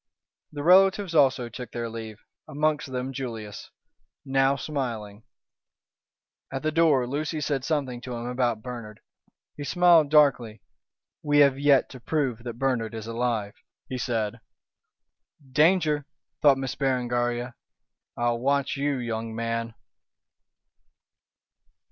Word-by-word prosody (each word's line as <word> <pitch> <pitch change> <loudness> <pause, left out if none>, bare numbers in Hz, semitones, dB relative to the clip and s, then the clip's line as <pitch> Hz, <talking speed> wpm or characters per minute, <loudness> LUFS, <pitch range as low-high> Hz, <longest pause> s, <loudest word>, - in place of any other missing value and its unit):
The 145 -1 -6
relatives 190 +1 +5
also 135 -5 +3
took 125 +1 -8
their 120 -1 -4
leave, 110 -1 -8 0.2
amongst 150 -2 -1
them 130 +1 -3
Julius, 115 -6 -6 0.6
now 135 0 +2
smiling. 115 -8 -5 1.3
At 135 +1 -4
the 155 - +1
door 155 -5 +3
Lucy 150 +5 -3
said 140 -3 -1
something 135 -5 -2
to 125 -1 -6
him 120 0 -5
about 120 -3 -1
Bernard. 115 -4 -8 0.6
He 145 - -5
smiled 170 -1 +4
darkly. 135 -7 +3 0.6
"We 145 -1 +1
have 140 -1 +4
yet 140 -2 +4
to 130 - -10
prove 130 -2 -1
that 120 -1 -6
Bernard 120 -4 -1
is 110 -1 -6
alive," 115 -3 -2 0.4
he 130 - -4
said. 115 -2 -2 1.1
"Danger!" 155 -1 +3 0.3
thought 140 -2 +6
Miss 135 -1 -3
Berengaria. 120 -2 -1 0.6
"I'll 120 0 0
watch 140 +2 0
you, 140 0 0
young 115 -2 -4
man." 115 0 -3
130 Hz, 120 wpm, -26 LUFS, 115-145 Hz, 1.3 s, thought